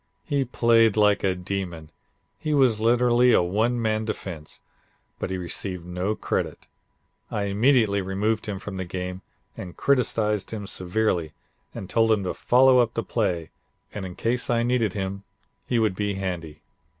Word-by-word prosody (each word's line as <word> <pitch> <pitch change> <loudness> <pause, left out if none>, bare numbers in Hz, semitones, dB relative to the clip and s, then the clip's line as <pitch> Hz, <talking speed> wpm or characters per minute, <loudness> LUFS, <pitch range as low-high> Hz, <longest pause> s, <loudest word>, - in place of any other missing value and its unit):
He 140 -3 0
played 115 -3 +3
like 105 -1 +3
a 95 -1 +1
demon; 90 -4 -5 0.5
he 155 -1 -1
was 125 -6 +4
literally 120 +1 +4
a - - +5
one 110 +7 0
man 110 -1 0
defense, 90 -8 -6 0.6
but - - -3
he 95 - -2
received 90 0 -3
no 90 +4 -2
credit. - - -3 0.6
I 105 - -2
immediately 105 0 +3
removed 105 +4 -1
him 100 -2 -3
from 95 0 -7
the 95 - -2
game 90 +1 -5 0.3
and 90 -2 -8
criticised 110 -6 +1
him 105 -2 -5
severely 90 -4 -1 0.4
and 95 - -6
told 115 +2 +2
him 105 -3 +2
to 90 - -2
follow 130 +1 +5
up 120 -1 +1
the 115 - -1
play 90 -8 -1 0.4
and 105 - -5
in 90 -1 -7
case 125 +2 -1
I 115 -1 +2
needed 120 -4 +1
him 100 -1 -4 0.4
he 120 - +1
would 110 -4 +2
be 105 0 -1
handy. 85 -5 -5
105 Hz, 160 wpm, -25 LUFS, 95-115 Hz, 0.6 s, a